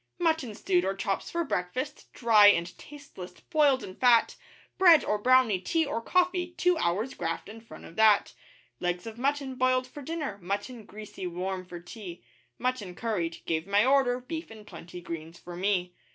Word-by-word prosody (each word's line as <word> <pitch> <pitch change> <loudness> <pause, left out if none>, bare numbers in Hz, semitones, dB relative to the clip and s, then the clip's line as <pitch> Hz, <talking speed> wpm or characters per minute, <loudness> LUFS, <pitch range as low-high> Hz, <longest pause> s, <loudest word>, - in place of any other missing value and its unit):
Mutton 320 - 0
stewed 180 -3 +1
or 195 +1 -1
chops 195 0 -2
for 340 0 -1
breakfast, 255 - -4
dry 220 -4 +6
and 175 -3 +3
tasteless, 275 -12 -11
boiled 285 -4 +2
in 185 - -8
fat; 240 -2 +4 0.4
Bread 345 -5 +7
or 210 - 0
brownie, 250 -4 +4
tea 325 - 0
or 230 -5 -3
coffee 360 +4 0
two 360 0 +3
hours' 205 +9 -1
graft 165 -1 -4
in 220 +2 -10
front 225 - -13
of 165 - -13
that; 220 -2 +4 0.5
Legs 175 0 -2
of 225 0 -8
mutton 275 0 -1
boiled 255 0 +1
for 270 +3 -11
dinner 290 -8 -4
mutton 205 +5 -4
greasy 210 -3 -8
warm 185 +2 -4
for 175 -1 -8
tea 175 0 -10 0.3
Mutton 245 -8 -3
curried 180 -8 -3
(gave 160 +1 -2
my 205 +2 +3
order, 260 -2 +3
beef 320 +6 -6
and 220 -2 -12
plenty 175 -1 -10
greens 165 0 -7
for 175 0 -10
me.) 180 -1 0
220 Hz, 175 wpm, -28 LUFS, 180-265 Hz, 0.5 s, Bread